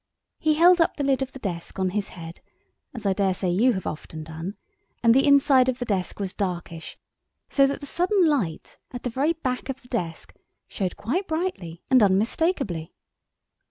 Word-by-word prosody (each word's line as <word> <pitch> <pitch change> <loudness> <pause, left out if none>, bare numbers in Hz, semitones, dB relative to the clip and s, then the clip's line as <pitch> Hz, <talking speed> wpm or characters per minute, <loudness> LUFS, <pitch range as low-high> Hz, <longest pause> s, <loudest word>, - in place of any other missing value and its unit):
He 310 -1 +2
held 350 +2 +6
up 330 - +2
the 290 - -1
lid 275 -1 +2
of 265 0 -2
the - - -9
desk 180 -9 -5
on 190 -1 +1
his 205 0 -2
head, 165 0 -9 0.5
as 225 -4 -9
I 195 - +3
daresay 190 -2 0
you 235 +8 +3
have 190 -3 -4
often 155 +1 -6
done, 160 +5 -6 0.5
and 230 -1 +6
the 270 +3 +4
inside 275 -2 +5
of 250 - -1
the 245 - -4
desk 195 -4 -2
was 195 -2 -3
darkish, 175 -4 -4 0.5
so 275 -1 +4
that 280 - -3
the - - -6
sudden 360 +4 +2
light 205 - -2
at 245 - -8
the 245 - -2
very 285 +7 +1
back 260 -5 -4
of 270 0 -5
the - - -17
desk 175 -10 -4 0.3
showed 185 -4 -3
quite 345 - -2
brightly 315 - -3
and 255 -2 +6
unmistakably. 205 - +1
235 Hz, 190 wpm, -25 LUFS, 185-280 Hz, 0.5 s, held